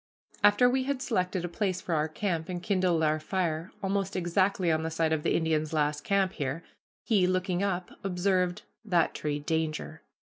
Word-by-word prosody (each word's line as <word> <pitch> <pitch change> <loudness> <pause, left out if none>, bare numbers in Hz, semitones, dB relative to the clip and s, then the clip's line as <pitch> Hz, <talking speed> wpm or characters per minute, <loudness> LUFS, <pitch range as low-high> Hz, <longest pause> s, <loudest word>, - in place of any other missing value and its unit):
After 205 +4 +6
we 260 +1 +1
had 280 -1 -1
selected 185 -7 -1
a - - -1
place 185 +1 -1
for 175 - -3
our 155 0 +1
camp, 165 0 -2
and 175 -1 -4
kindled 185 -5 +2
our 155 0 +2
fire, 165 0 -2
almost 195 0 -1
exactly 185 0 +1
on 160 0 +1
the 160 - -2
site 160 0 +1
of 155 - 0
the - - +1
Indian's 155 -1 0
last 150 -1 0
camp 195 -2 +1
here, 145 +2 -3 0.4
he, 200 -6 +3
looking 185 0 0
up, 185 -3 -1
observed, 180 -1 0 0.2
"That 180 -6 +2
tree 150 -1 -2
danger." 155 +1 -2
180 Hz, 180 wpm, -29 LUFS, 160-195 Hz, 0.4 s, After